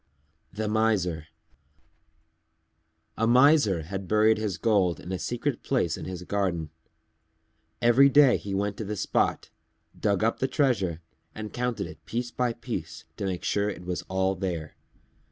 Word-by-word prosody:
_ - - -19
THE 110 0 -1
MISER 100 -7 0 1.9
A 115 - +1
Miser 125 - +5
had 95 +3 -6
buried 110 +1 +4
his 105 -4 -2
gold 95 -5 +2
in 90 - -8
a 95 - -2
secret 120 +4 -2
place 105 - 0
in - - -7
his 90 -1 -6
garden. 90 -6 -2 1.1
Every 125 +4 +6
day 140 -2 +6
he 100 -1 -5
went 100 +1 -1
to - - -4
the 105 +1 -4
spot, - - 0 0.4
dug 100 -1 0
up 115 - +1
the 130 - +1
treasure 115 - 0 0.3
and 110 -1 -7
counted 125 -1 -2
it - - -11
piece 120 +1 -3
by 125 -1 0
piece 115 -9 -6
to - - -3
make 90 -2 -3
sure 100 0 0
it 90 -3 -7
was 90 0 -3
all 95 0 +1
there. 90 -5 -4
105 Hz, 155 wpm, -27 LUFS, 90-120 Hz, 1.9 s, Every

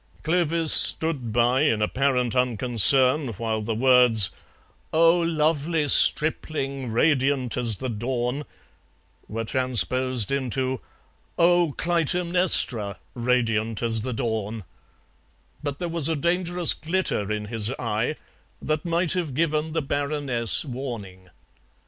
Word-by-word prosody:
Clovis 165 -1 +2
stood 145 -8 +3
by 120 +3 +2
in 130 -8 +1
apparent 125 +2 0
unconcern 125 +3 +2
while 110 +1 -3
the 110 +1 -3
words: 125 -4 +4 0.6
"Oh, 165 +2 +4
lovely 160 -1 0
stripling, 140 -5 +1
radiant 135 0 +1
as 115 -4 0
the 130 - -5
dawn," 125 +4 -3 0.8
were 115 +1 -5
transposed 130 0 -1
into: 130 -1 -2 0.6
"Oh, 175 -3 +2
Clytemnestra, 170 - +2 0.2
radiant 115 -3 -1
as 115 -1 +3
the 130 +3 -4
dawn," 110 -3 -4 1.0
but 145 -2 -5
there 175 - -4
was 165 -3 0
a 160 - 0
dangerous 175 +2 +1
glitter 160 - -2
in 105 0 -3
his 110 0 -2
eye 115 +4 -2 0.4
that 155 0 -3
might 170 0 -1
have 170 -8 -3
given 155 0 -1
the 160 -2 -1
Baroness 140 - +1
warning. 115 -9 -8
130 Hz, 110 wpm, -24 LUFS, 115-155 Hz, 1.0 s, words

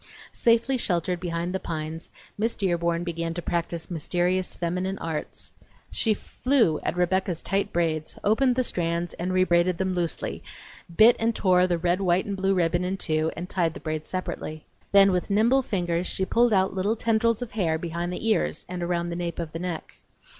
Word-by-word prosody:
Safely 235 +3 +3
sheltered 180 -4 0
behind 170 0 -3
the 190 - -1
pines, 160 -1 -5 0.3
Miss 225 +2 0
Dearborn 170 -3 0
began 165 -1 -3
to 175 - -3
practice 170 0 -3
mysterious 175 +3 0
feminine 180 +3 -2
arts. 160 -2 -5 0.4
She 220 -2 +1
flew 235 - +1
at - - -3
Rebecca's 180 -1 0
tight 195 +1 0
braids, 160 -2 -1
opened 245 +4 +3
the 255 - +2
strands 170 -4 -1
and 180 +2 -3
rebraided 180 -1 +3
them 190 0 -1
loosely; 175 -3 -3 0.5
bit 230 +3 +8
and 225 0 +1
tore 180 -1 +4
the 175 -1 +1
red, 175 +2 0
white, 180 0 +2
and 200 - -3
blue 195 0 +1
ribbon 175 0 +1
in 185 +2 -2
two 155 -3 +1
and 175 +2 -4
tied 170 -4 0
the - - -6
braids 155 -1 -4
separately. 155 -4 -5 0.3
Then 195 0 +7
with 180 +1 -1
nimble 230 +7 +4
fingers 175 -6 -1
she 190 - -1
pulled 235 +4 +3
out 190 -2 +2
little 195 +4 0
tendrils 230 +1 +1
of 240 - -9
hair 170 -7 0
behind 170 +1 -3
the 180 +5 -3
ears 220 - +1
and 180 0 -5
around 175 0 -1
the - - -3
nape 170 -1 -3
of 165 -2 -4
the 165 - -5
neck. 175 -2 -5
180 Hz, 185 wpm, -26 LUFS, 170-195 Hz, 0.5 s, bit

